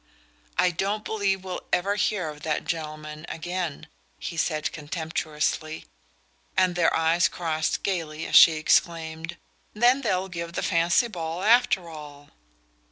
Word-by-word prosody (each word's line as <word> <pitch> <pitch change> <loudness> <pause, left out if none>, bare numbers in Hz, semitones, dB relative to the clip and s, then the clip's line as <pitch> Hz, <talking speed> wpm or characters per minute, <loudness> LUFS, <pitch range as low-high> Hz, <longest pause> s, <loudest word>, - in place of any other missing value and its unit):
"I 180 - +4
don't 200 +5 -2
believe 195 -3 0
we'll 185 -1 -5
ever 195 +3 +2
hear 205 -5 0
of 150 -1 -10
that 150 -1 -2
gentleman 155 -2 -5
again," 175 -2 -4 0.3
he 170 - -6
said 155 -2 -1
contemptuously; 155 0 -3 0.7
and 185 -1 +4
their 175 -2 +3
eyes 165 +1 +3
crossed 160 -2 -2
gaily 165 -5 -2
as - - -2
she 165 - +10
exclaimed: 160 +1 0 0.4
"Then 245 +5 +4
they'll 190 -6 0
give 170 -2 -6
the - - -2
fancy 170 +6 +3
ball 170 -3 -5
after 225 -5 +4
all?" 145 -3 -11
170 Hz, 135 wpm, -26 LUFS, 155-185 Hz, 0.7 s, she